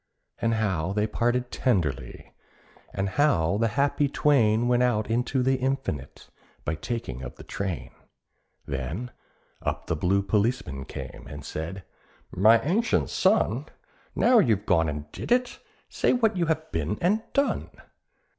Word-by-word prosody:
And 115 Hz, -1 st, +1 dB
how 95 Hz, -5 st, 0 dB
they 105 Hz, +1 st, +1 dB
parted 120 Hz, +3 st, 0 dB
tenderly, 75 Hz, -, -1 dB, 0.6 s
and 95 Hz, 0 st, -1 dB
how 100 Hz, -, +2 dB
the 115 Hz, -, +3 dB
happy 145 Hz, +1 st, +2 dB
twain 120 Hz, -6 st, +3 dB
Went 125 Hz, 0 st, +3 dB
out 110 Hz, -3 st, +1 dB
into 125 Hz, +2 st, +1 dB
the 130 Hz, +1 st, +2 dB
Infinite 130 Hz, -, -3 dB, 0.4 s
by -, -, 0 dB
taking 80 Hz, -, -4 dB
of 65 Hz, -2 st, -7 dB
the -, -, -12 dB
train; 95 Hz, -4 st, -4 dB, 0.7 s
Then 75 Hz, -, -4 dB, 0.5 s
up -, -, -3 dB
the -, -, -1 dB
blue 95 Hz, +5 st, +1 dB
policeman 100 Hz, -, 0 dB
came, -, -, -8 dB
and 70 Hz, 0 st, -8 dB
said, 85 Hz, +6 st, -5 dB, 0.5 s
"My 110 Hz, +5 st, +5 dB
ancient 205 Hz, +10 st, +1 dB
son, -, -, +2 dB, 0.5 s
Now 245 Hz, -1 st, +5 dB
you 115 Hz, -, +4 dB
have 100 Hz, +2 st, -10 dB
gone 80 Hz, -6 st, +3 dB
and 75 Hz, 0 st, -6 dB
did -, -, -7 dB
it; 250 Hz, 0 st, +2 dB, 0.3 s
say -, -, +1 dB
what 225 Hz, -4 st, +2 dB
you 175 Hz, -2 st, 0 dB
have 160 Hz, 0 st, -1 dB
been 80 Hz, +5 st, -1 dB
and 205 Hz, +6 st, +2 dB
done?" 280 Hz, 0 st, +1 dB
110 Hz, 145 wpm, -26 LUFS, 80-130 Hz, 0.7 s, My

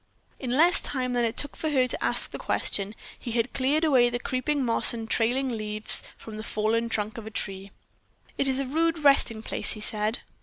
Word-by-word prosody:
In 255 Hz, -1 st, -2 dB
less 345 Hz, +3 st, +5 dB
time 255 Hz, -3 st, -2 dB
than 240 Hz, -1 st, +2 dB
it 225 Hz, 0 st, -3 dB
took 290 Hz, -, -1 dB
her 280 Hz, -5 st, +1 dB
to -, -, -4 dB
ask -, -, -1 dB
the -, -, -6 dB
question, 200 Hz, +1 st, 0 dB, 0.2 s
he 235 Hz, -, -5 dB
had 230 Hz, +1 st, 0 dB
cleared 280 Hz, +4 st, +1 dB
away 260 Hz, -6 st, +4 dB
the 240 Hz, -, -2 dB
creeping 255 Hz, +3 st, -1 dB
moss 235 Hz, 0 st, +1 dB
and 225 Hz, -1 st, -6 dB
trailing 245 Hz, +4 st, +1 dB
leaves 215 Hz, -2 st, 0 dB, 0.2 s
from 220 Hz, -1 st, -9 dB
the 215 Hz, -, -6 dB
fallen 225 Hz, +2 st, 0 dB
trunk 215 Hz, 0 st, -2 dB
of 220 Hz, -, -9 dB
a -, -, -4 dB
tree. 195 Hz, -2 st, -2 dB, 0.7 s
"It 275 Hz, -, +1 dB
is 265 Hz, -1 st, +1 dB
a 275 Hz, -, -1 dB
rude 325 Hz, +5 st, +1 dB
resting 235 Hz, -6 st, +3 dB
place," -, -, 0 dB
he 215 Hz, -, -7 dB
said. 215 Hz, +1 st, 0 dB
240 Hz, 205 wpm, -26 LUFS, 220-270 Hz, 0.7 s, less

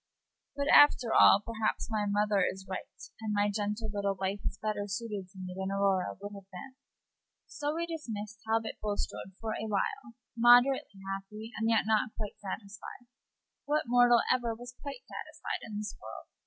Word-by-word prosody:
But, 280 Hz, 0 st, -1 dB
after 250 Hz, -5 st, +7 dB
all, 200 Hz, -, +7 dB
perhaps 225 Hz, -1 st, -1 dB
my 210 Hz, -1 st, 0 dB
mother 205 Hz, -1 st, +2 dB
is 190 Hz, +1 st, -2 dB
right, 190 Hz, 0 st, -5 dB, 0.3 s
and 220 Hz, -1 st, -3 dB
my 205 Hz, 0 st, +2 dB
gentle 210 Hz, +1 st, -2 dB
little 200 Hz, -1 st, 0 dB
wife 195 Hz, +1 st, -2 dB
is -, -, -5 dB
better 210 Hz, -2 st, -2 dB
suited 205 Hz, -2 st, -4 dB
to 195 Hz, -, -18 dB
me 185 Hz, -1 st, -6 dB
than 190 Hz, 0 st, -3 dB
Aurora 195 Hz, -2 st, +1 dB
would 205 Hz, +1 st, -7 dB
have 195 Hz, -1 st, -11 dB
been." 195 Hz, +9 st, -9 dB, 0.7 s
So 295 Hz, +1 st, -3 dB
we 335 Hz, +1 st, -1 dB
dismiss 220 Hz, -11 st, -5 dB
Talbot 225 Hz, 0 st, -1 dB
Bulstrode 205 Hz, -2 st, -4 dB
for 225 Hz, -1 st, -3 dB
a 220 Hz, -, -3 dB
while, 230 Hz, +4 st, -2 dB, 0.2 s
moderately 240 Hz, -3 st, +5 dB
happy, 195 Hz, +3 st, -6 dB
and 225 Hz, +2 st, 0 dB
yet 225 Hz, -2 st, +3 dB
not 220 Hz, 0 st, +1 dB
quite 210 Hz, -2 st, -5 dB
satisfied. 205 Hz, +4 st, -7 dB, 0.6 s
What 300 Hz, +1 st, +1 dB
mortal 245 Hz, 0 st, +5 dB
ever 240 Hz, -3 st, -1 dB
was 245 Hz, +1 st, -9 dB
quite 280 Hz, -3 st, -7 dB
satisfied -, -, -5 dB
in 215 Hz, -2 st, -6 dB
this 210 Hz, 0 st, -4 dB
world? 110 Hz, -, -9 dB
215 Hz, 170 wpm, -31 LUFS, 200-235 Hz, 0.7 s, after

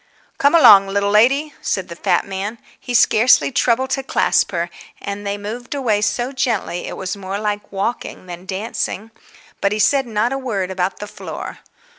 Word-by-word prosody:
"Come 285 Hz, +4 st, +4 dB
along, 200 Hz, -11 st, +8 dB
little 200 Hz, +1 st, 0 dB
lady," 275 Hz, +8 st, +3 dB
said 190 Hz, -2 st, -2 dB
the 170 Hz, -, -8 dB
fat -, -, +1 dB
man. 195 Hz, +3 st, -4 dB, 0.2 s
He 245 Hz, -, -4 dB
scarcely 235 Hz, +4 st, +4 dB
troubled 260 Hz, 0 st, +1 dB
to 270 Hz, -, 0 dB
clasp 265 Hz, -, +1 dB
her, 170 Hz, -1 st, -2 dB, 0.3 s
and 200 Hz, 0 st, -6 dB
they 200 Hz, 0 st, -2 dB
moved 230 Hz, +6 st, -6 dB
away 225 Hz, -7 st, +1 dB
so 240 Hz, +5 st, -1 dB
gently, 235 Hz, -9 st, -2 dB
it -, -, -6 dB
was 190 Hz, +1 st, -4 dB
more 195 Hz, 0 st, -5 dB
like 210 Hz, -1 st, -3 dB
walking 200 Hz, 0 st, -4 dB
than 180 Hz, +1 st, -9 dB
dancing. 210 Hz, +2 st, -4 dB, 0.5 s
But 200 Hz, +1 st, +2 dB
he -, -, -1 dB
said 270 Hz, +5 st, +2 dB
not 225 Hz, +3 st, 0 dB
a 270 Hz, -, -2 dB
word 200 Hz, -8 st, -3 dB
about 185 Hz, 0 st, -2 dB
the 210 Hz, -, -6 dB
floor. -, -, -8 dB
210 Hz, 180 wpm, -19 LUFS, 195-245 Hz, 0.5 s, along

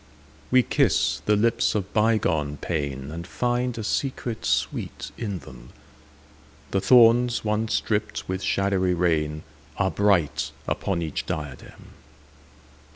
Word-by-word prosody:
We 130 Hz, 0 st, +5 dB
kiss -, -, +1 dB
the 105 Hz, -, +4 dB
lips 115 Hz, +2 st, +2 dB
of 100 Hz, -3 st, -3 dB
bygone 90 Hz, -10 st, +1 dB
painAnd 75 Hz, +1 st, -4 dB
find 125 Hz, +1 st, -1 dB
a 110 Hz, -, -4 dB
secret 120 Hz, 0 st, -2 dB
sweet -, -, -2 dB
in 105 Hz, -5 st, -4 dB
them:The 75 Hz, +4 st, -10 dB
thorns 120 Hz, +2 st, +5 dB
once 110 Hz, +1 st, +1 dB
dripped 105 Hz, -1 st, -2 dB
with 95 Hz, 0 st, -3 dB
shadowy 95 Hz, -2 st, +1 dB
rainAre 75 Hz, 0 st, -2 dB
bright 100 Hz, -8 st, +1 dB
upon 90 Hz, -4 st, -1 dB
each 80 Hz, -3 st, -4 dB
diadem. 75 Hz, -5 st, -7 dB
95 Hz, 105 wpm, -25 LUFS, 75-110 Hz, -, We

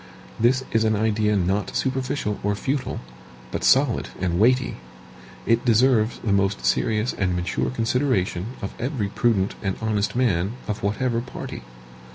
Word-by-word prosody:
This 125 Hz, +3 st, +3 dB
is 110 Hz, 0 st, +2 dB
an 110 Hz, 0 st, +2 dB
idea 105 Hz, 0 st, +1 dB
not 95 Hz, +2 st, 0 dB
superficial 130 Hz, -5 st, -1 dB
or 105 Hz, 0 st, 0 dB
futile, 130 Hz, +5 st, -2 dB, 0.5 s
but -, -, -3 dB
solid -, -, +3 dB
and 90 Hz, -1 st, 0 dB
weighty. 125 Hz, +3 st, +3 dB, 0.7 s
It 115 Hz, +1 st, +2 dB
deserves 120 Hz, -1 st, +3 dB
the 105 Hz, -, +1 dB
most 100 Hz, 0 st, +1 dB
serious 110 Hz, +2 st, +1 dB
and 90 Hz, -3 st, 0 dB
mature 90 Hz, +1 st, -1 dB
consideration 115 Hz, -6 st, 0 dB, 0.2 s
of 100 Hz, -, -4 dB
every 125 Hz, -5 st, -2 dB
prudent 105 Hz, -3 st, +1 dB
and 95 Hz, -2 st, -1 dB
honest 110 Hz, -1 st, -1 dB
man 105 Hz, -5 st, +1 dB
of 105 Hz, 0 st, -3 dB
whatever 115 Hz, +3 st, 0 dB
party. 120 Hz, -, -7 dB
110 Hz, 145 wpm, -24 LUFS, 100-125 Hz, 0.7 s, This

